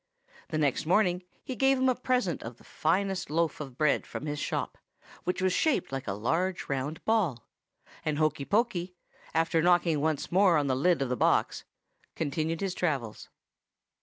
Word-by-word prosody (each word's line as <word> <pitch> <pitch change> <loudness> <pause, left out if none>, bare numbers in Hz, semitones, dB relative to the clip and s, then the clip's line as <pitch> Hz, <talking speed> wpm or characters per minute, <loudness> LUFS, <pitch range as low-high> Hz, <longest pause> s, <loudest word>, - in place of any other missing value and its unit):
The 155 - -3
next 150 0 0
morning 180 -1 +3 0.2
he 260 - -5
gave 270 +1 +3
him 260 - +1
for 260 - +5
a - - -1
present 250 - 0
the 115 0 -9
finest 195 -3 -1
loaf 165 +1 0
of 135 -4 -8
bread 155 -2 +2
in - - -4
his 150 -1 -3
shop, - - -3 0.5
which 180 +1 -1
was 185 -1 +2
shaped 300 - +1
like 135 -1 -4
a 100 - -1
large 165 - -1
round 140 +3 -3
ball; 185 - +1 0.6
and 155 -2 -1
Hokey 155 -2 0
Pokey, 185 - 0 0.4
after 165 0 +2
knocking 170 -3 +3
once 155 -2 -1
more 185 -2 +5
on 145 - +1
the 130 -2 +1
lid 150 +2 +2
of 130 - -4
the 125 - 0
box, - - +1 0.5
continued 160 +2 -2
his 195 -2 -1
travels. 140 -12 -2
165 Hz, 175 wpm, -29 LUFS, 145-185 Hz, 0.6 s, for